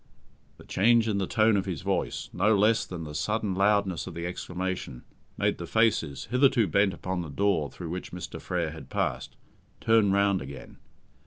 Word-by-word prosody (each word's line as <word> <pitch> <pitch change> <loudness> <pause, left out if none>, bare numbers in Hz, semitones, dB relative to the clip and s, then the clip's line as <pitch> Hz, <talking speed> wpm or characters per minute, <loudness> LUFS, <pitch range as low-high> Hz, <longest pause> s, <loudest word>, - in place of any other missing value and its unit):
The - - -14
change 115 +3 +3
in 100 -2 0
the 95 - -1
tone 110 -1 +3
of 95 -1 0
his 85 -6 -4
voice, - - -2
no 105 0 +3
less 110 +3 +3
than 85 -3 -6
the 75 -1 -7
sudden 105 +6 -1
loudness 100 -2 +1
of - - -7
the 85 0 -4
exclamation, 90 -6 -4 0.3
made - - 0
the - - -6
faces, 105 - +1
hitherto 125 -2 +4
bent 100 +3 +2
upon 95 -1 -3
the 85 - -7
door 80 -1 +1
through 85 +3 -8
which 90 +1 -5
Mr. 90 0 -7
Frere 85 -3 -2
had 80 -1 -11
passed, - - -2 0.4
turn 110 -3 +3
round 100 -1 +2
again. 65 0 -10
95 Hz, 180 wpm, -27 LUFS, 85-105 Hz, 0.4 s, hitherto